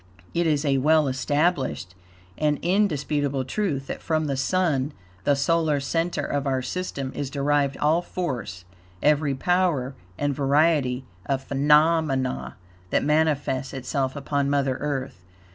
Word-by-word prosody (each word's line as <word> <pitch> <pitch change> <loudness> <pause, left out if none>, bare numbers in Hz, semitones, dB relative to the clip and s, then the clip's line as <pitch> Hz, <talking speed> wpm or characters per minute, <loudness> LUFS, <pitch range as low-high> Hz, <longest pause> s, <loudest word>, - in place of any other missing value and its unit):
It 170 0 +1
is 150 -1 +1
a 135 -2 +2
well 155 +2 +4
established 135 - 0 0.4
and 150 +2 +1
indisputable 145 -8 +1
truth 140 -2 -2
that - - -6
from 155 -1 0
the 140 -2 -1
Sun, 145 -1 0 0.3
the 145 - +4
solar 155 +1 +1
center 165 +5 -1
of 145 -1 -2
our 130 -1 0
system, 140 -3 -4
is 140 - -3
derived 140 0 +1
all 155 +3 +2
force, 120 - -4 0.4
every 145 -2 +3
power 165 -4 +1 0.2
and 145 0 0
variety 140 -2 +2 0.2
of 135 -1 -1
phenomena 140 - +2 0.3
that - - +1
manifests 145 -4 +1
itself 130 +1 -2
upon 140 0 -1
Mother 140 -2 +1
Earth. 135 -8 -4
145 Hz, 130 wpm, -25 LUFS, 135-155 Hz, 0.4 s, well